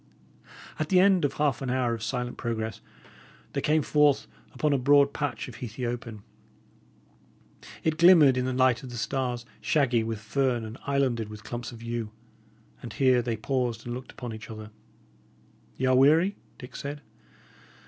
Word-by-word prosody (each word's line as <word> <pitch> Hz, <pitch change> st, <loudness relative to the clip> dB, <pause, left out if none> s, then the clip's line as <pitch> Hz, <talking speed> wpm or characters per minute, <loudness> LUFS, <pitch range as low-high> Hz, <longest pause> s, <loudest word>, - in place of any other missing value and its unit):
At 155 Hz, -, -2 dB
the 185 Hz, -, +5 dB
end 190 Hz, -4 st, +4 dB
of 145 Hz, -, -1 dB
half 145 Hz, -4 st, 0 dB
an 135 Hz, -, -3 dB
hour 125 Hz, -2 st, +1 dB
of 115 Hz, -, -5 dB
silent 125 Hz, +1 st, -3 dB
progress 110 Hz, -1 st, -4 dB, 0.7 s
they -, -, -1 dB
came 155 Hz, 0 st, +2 dB
forth 150 Hz, -1 st, +3 dB, 0.3 s
upon 150 Hz, -1 st, 0 dB
a 140 Hz, -, +2 dB
broad 140 Hz, +2 st, +4 dB
patch 145 Hz, -1 st, -3 dB
of 125 Hz, -, -10 dB
heathy 120 Hz, +1 st, -5 dB
open. 115 Hz, -3 st, -5 dB, 1.6 s
It 160 Hz, 0 st, 0 dB
glimmered 165 Hz, -6 st, +7 dB
in 125 Hz, 0 st, 0 dB
the 130 Hz, -, -1 dB
light 130 Hz, -2 st, +3 dB
of 130 Hz, -, -9 dB
the 120 Hz, -, -7 dB
stars, 125 Hz, -1 st, -2 dB, 0.2 s
shaggy 125 Hz, -6 st, +2 dB
with 115 Hz, 0 st, -3 dB
fern 120 Hz, +1 st, 0 dB
and 110 Hz, +3 st, -9 dB
islanded 130 Hz, -6 st, 0 dB
with 105 Hz, -1 st, -10 dB
clumps 120 Hz, +2 st, -6 dB
of 115 Hz, -1 st, -11 dB
yew. 115 Hz, -2 st, -3 dB, 0.7 s
And -, -, -8 dB
here 130 Hz, -2 st, +3 dB
they 115 Hz, -1 st, -2 dB
paused 120 Hz, -1 st, -2 dB
and 120 Hz, -, -4 dB
looked 125 Hz, +1 st, -7 dB
upon 120 Hz, -3 st, -7 dB
each 110 Hz, 0 st, -9 dB
other. 110 Hz, -1 st, -9 dB, 1.1 s
"Y' 130 Hz, -, -1 dB
are 130 Hz, 0 st, +4 dB
weary?" 160 Hz, +9 st, +4 dB, 0.2 s
Dick 125 Hz, -, -11 dB
said. 145 Hz, 0 st, -6 dB
125 Hz, 170 wpm, -27 LUFS, 115-140 Hz, 1.6 s, glimmered